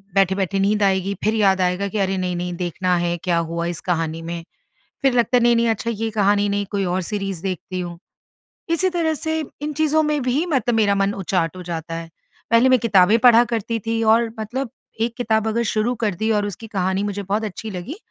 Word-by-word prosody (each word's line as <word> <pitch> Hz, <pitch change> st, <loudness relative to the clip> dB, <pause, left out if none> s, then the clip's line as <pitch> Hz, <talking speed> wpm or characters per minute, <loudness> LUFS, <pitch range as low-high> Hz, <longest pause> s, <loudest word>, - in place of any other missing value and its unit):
बैठे-बैठे 195 Hz, 0 st, +2 dB
नींद 205 Hz, +1 st, +2 dB
आएगी, 195 Hz, 0 st, +1 dB
फिर 215 Hz, +1 st, +2 dB
याद 195 Hz, -3 st, +3 dB
आएगा 180 Hz, +2 st, 0 dB
कि, 205 Hz, -, -4 dB
"अरे! 195 Hz, 0 st, +1 dB
नहीं-नहीं, 180 Hz, -1 st, -2 dB
देखना 180 Hz, +1 st, 0 dB
है, 175 Hz, 0 st, 0 dB
क्या 175 Hz, -2 st, +1 dB
हुआ 170 Hz, 0 st, -2 dB
इस 170 Hz, -1 st, -3 dB
कहानी 165 Hz, -1 st, -1 dB
में।" 170 Hz, 0 st, -5 dB, 0.6 s
फिर 270 Hz, -2 st, +4 dB
लगता 240 Hz, +1 st, +3 dB
है, 245 Hz, -, +3 dB
"नहीं-नहीं, 235 Hz, 0 st, +4 dB
अच्छा, 225 Hz, +1 st, -1 dB
ये 225 Hz, 0 st, -2 dB
कहानी 205 Hz, -1 st, +2 dB
नहीं, 200 Hz, 0 st, -1 dB
कोई 200 Hz, -2 st, -1 dB
और 185 Hz, -, 0 dB
सीरीज़ 195 Hz, -4 st, -3 dB
देखती 185 Hz, -1 st, -4 dB
हूँ।" 175 Hz, -1 st, -6 dB, 0.7 s
इसी 365 Hz, +3 st, +2 dB
तरह 320 Hz, -2 st, +1 dB
से 315 Hz, +2 st, -2 dB, 0.2 s
इन 300 Hz, -, -2 dB
चीज़ों 315 Hz, 0 st, +3 dB
में 300 Hz, -1 st, +1 dB
भी 255 Hz, +6 st, +1 dB
मतलब 250 Hz, -7 st, +1 dB
मेरा 210 Hz, -2 st, +3 dB
मन 195 Hz, +1 st, +1 dB
उचाट 175 Hz, -1 st, 0 dB
हो 180 Hz, -, -7 dB
जाता 165 Hz, 0 st, -4 dB
है। 165 Hz, 0 st, -6 dB, 0.4 s
पहले 230 Hz, +3 st, +5 dB
मैं 255 Hz, -, +5 dB
किताबें 210 Hz, -1 st, +4 dB
पढ़ा 240 Hz, 0 st, +7 dB
करती 230 Hz, +1 st, -2 dB
थी 225 Hz, 0 st, 0 dB
और 230 Hz, -1 st, +1 dB
मतलब 240 Hz, +4 st, -3 dB, 0.3 s
एक 230 Hz, +1 st, 0 dB
किताब 220 Hz, -3 st, +1 dB
अगर 230 Hz, +2 st, 0 dB
शुरू 220 Hz, +3 st, +1 dB
कर 205 Hz, -4 st, 0 dB
दी 220 Hz, -, +2 dB
और 205 Hz, -, -1 dB
उसकी 205 Hz, +3 st, -7 dB
कहानी 190 Hz, +2 st, 0 dB
मुझे 205 Hz, 0 st, -3 dB
बहुत 205 Hz, +3 st, -1 dB
अच्छी 215 Hz, +1 st, -6 dB
लगी, 195 Hz, -, -6 dB
205 Hz, 210 wpm, -21 LUFS, 185-230 Hz, 0.7 s, पढ़ा